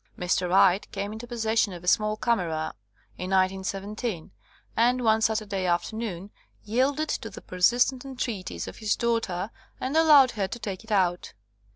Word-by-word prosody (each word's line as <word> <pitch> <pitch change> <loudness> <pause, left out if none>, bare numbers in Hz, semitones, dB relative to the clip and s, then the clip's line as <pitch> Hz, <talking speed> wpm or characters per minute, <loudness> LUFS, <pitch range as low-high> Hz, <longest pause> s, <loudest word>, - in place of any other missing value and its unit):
Mr. 180 0 0
Wright 190 +1 +4
came 200 +1 -4
into 225 +2 -8
possession 225 -3 0
of 175 0 -9
a - - -10
small 215 +3 +2
camera 175 -10 -1 0.5
in 180 - -4
1917, 195 +1 -1 0.4
and 245 +2 +2
one 220 -1 +3
Saturday 210 -4 0
afternoon 195 +2 -2 0.3
yielded 265 +8 +1
to 225 - -3
the 200 - -10
persistent 245 +8 +2
entreat 245 -8 -4
ies - - -6
of - - -8
his 215 -2 0
daughter 225 -4 -1 0.3
and 265 +4 -3
allowed 300 -5 +7
her 200 -4 -2
to 215 - -6
take 200 -4 -6
it 220 - -12
out. 180 -3 +1
215 Hz, 160 wpm, -26 LUFS, 185-235 Hz, 0.5 s, allowed